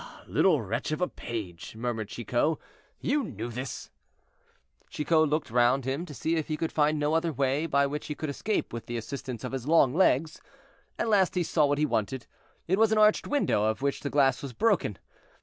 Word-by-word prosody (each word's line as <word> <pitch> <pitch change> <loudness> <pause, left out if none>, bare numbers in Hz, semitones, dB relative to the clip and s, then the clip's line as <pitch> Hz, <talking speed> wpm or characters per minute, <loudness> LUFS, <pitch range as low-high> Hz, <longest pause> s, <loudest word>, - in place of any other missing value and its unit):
"Ah! - - -14
little 155 -10 +3
wretch 115 +8 -3
of 155 - -1
a 180 - +1
page," 105 -6 -7
murmured 110 -2 -3
Chicot, 120 +8 0 0.4
"you 285 +2 0
knew 115 - -5
this." 125 +2 -6 1.0
Chicot 155 +1 +2
looked 150 -5 -1
round 120 +2 +3
him 140 +7 -2
to 150 - -8
see 165 +4 0
if 155 - -2
he 155 - -2
could 165 0 -2
find 150 0 +2
no 150 +1 0
other 165 +1 +1
way 140 +3 0
by 140 -2 +3
which 145 +2 -4
he 150 - -4
could 155 - -4
escape 210 - -2
with 115 -1 -6
the 120 - -3
assistance 125 +1 -6
of 125 - -4
his 135 -1 -4
long 150 -5 +5
legs. 160 -3 +2 0.6
At - - -1
last 195 -5 +3
he 180 - +2
saw 155 -2 +2
what 145 0 +1
he 150 - +2
wanted: 120 -1 -2 0.4
it 190 +4 +2
was 220 -1 +4
an 220 - +3
arched 215 0 +4
window, 280 - +1
of 110 +5 -1
which 140 -1 0
the 140 - -4
glass 135 -3 +3
was 140 -3 -6
broken. 205 - +1
145 Hz, 210 wpm, -28 LUFS, 120-165 Hz, 1.0 s, long